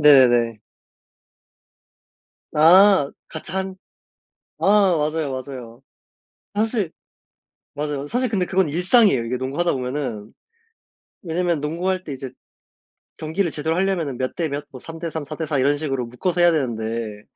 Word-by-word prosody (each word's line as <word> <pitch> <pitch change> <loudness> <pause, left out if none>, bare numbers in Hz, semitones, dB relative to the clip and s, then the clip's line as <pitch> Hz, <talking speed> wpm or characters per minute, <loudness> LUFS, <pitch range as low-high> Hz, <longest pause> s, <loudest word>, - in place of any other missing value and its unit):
네네. 120 -6 +5 2.0
아. 175 0 +6 0.2
같이 160 - -7
한 190 0 -3 0.9
아 200 -2 +5
맞아요, 155 -1 -1
맞아요. 130 -2 -8 0.7
사실 215 -4 0 0.8
맞아요. 145 -1 -3
사실 250 +6 0
근데 200 -5 0
그건 190 -1 +1
일상이에요 180 - +3
이게 120 +2 -2
농구하다 140 +7 -1
보면은. 125 -5 -4 0.9
왜냐면 170 -2 -1
농구할 180 +5 -1
때 150 - -6
이제 130 0 -6 0.9
경기를 160 +3 -1
제대로 160 +2 0
하려면은 175 -9 -1
몇 130 0 -2
대 165 -2 -1
몇 145 0 -4
뭐 130 - -10
3 165 +4 -9
대 165 0 -4
3, 160 0 -4
4 155 +2 -7
대 160 - -3
4 150 -2 0
이런 140 +2 +3
식으로 135 -5 -2
묶어서 170 +9 -2
해야 175 0 +6
되는데 115 -7 -2
155 Hz, 265 characters per minute, -22 LUFS, 130-180 Hz, 2.0 s, 아